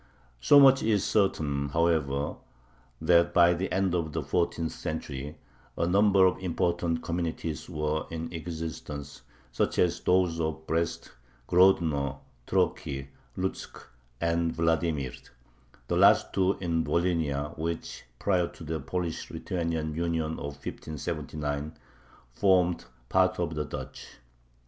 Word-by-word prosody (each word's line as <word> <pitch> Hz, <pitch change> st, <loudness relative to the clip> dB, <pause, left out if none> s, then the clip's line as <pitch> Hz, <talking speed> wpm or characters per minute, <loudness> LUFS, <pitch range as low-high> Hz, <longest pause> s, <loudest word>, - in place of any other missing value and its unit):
So 145 Hz, -, +7 dB
much 135 Hz, -1 st, +7 dB
is 105 Hz, -3 st, +2 dB
certain, 75 Hz, -9 st, +1 dB
however, 75 Hz, -3 st, 0 dB, 0.6 s
that 85 Hz, +1 st, +3 dB
by 85 Hz, 0 st, +6 dB
the 90 Hz, +2 st, -3 dB
end 95 Hz, -1 st, +1 dB
of 80 Hz, -3 st, -1 dB
the -, -, -2 dB
fourteenth 85 Hz, -2 st, 0 dB
century 75 Hz, -1 st, -5 dB, 0.4 s
a -, -, +1 dB
number 100 Hz, +1 st, +5 dB
of 95 Hz, -, +2 dB
important 85 Hz, -2 st, -1 dB
communities 85 Hz, -1 st, -3 dB
were 75 Hz, -2 st, -2 dB
in 80 Hz, +1 st, -5 dB
existence, 80 Hz, -3 st, -6 dB, 0.3 s
such -, -, -1 dB
as 85 Hz, -1 st, +2 dB
those 90 Hz, -2 st, +2 dB
of 80 Hz, -1 st, -2 dB
Brest, 85 Hz, +1 st, -2 dB, 0.4 s
Grodno, 80 Hz, -7 st, +3 dB, 0.3 s
Troki, 70 Hz, 0 st, -1 dB, 0.3 s
Lutzk, 95 Hz, +1 st, -4 dB, 0.4 s
and 85 Hz, 0 st, +1 dB
Vladimir, 80 Hz, -5 st, 0 dB, 0.7 s
the -, -, 0 dB
last -, -, +5 dB
two 95 Hz, +1 st, +2 dB
in 85 Hz, -3 st, 0 dB
Volhynia, 80 Hz, -5 st, 0 dB
which, 80 Hz, +1 st, -4 dB
prior 90 Hz, 0 st, +1 dB
to -, -, -12 dB
the 80 Hz, +1 st, -3 dB
Polish 90 Hz, -1 st, -4 dB
Lithuanian 85 Hz, -3 st, -3 dB
Union 80 Hz, -1 st, -1 dB
of 70 Hz, 0 st, -6 dB
1579, 75 Hz, -1 st, -4 dB, 0.5 s
formed 90 Hz, +3 st, +2 dB, 0.2 s
part 95 Hz, +2 st, +3 dB
of 85 Hz, -2 st, -1 dB
the 75 Hz, 0 st, -2 dB
Duchy. -, -, -7 dB
85 Hz, 120 wpm, -28 LUFS, 75-90 Hz, 0.7 s, So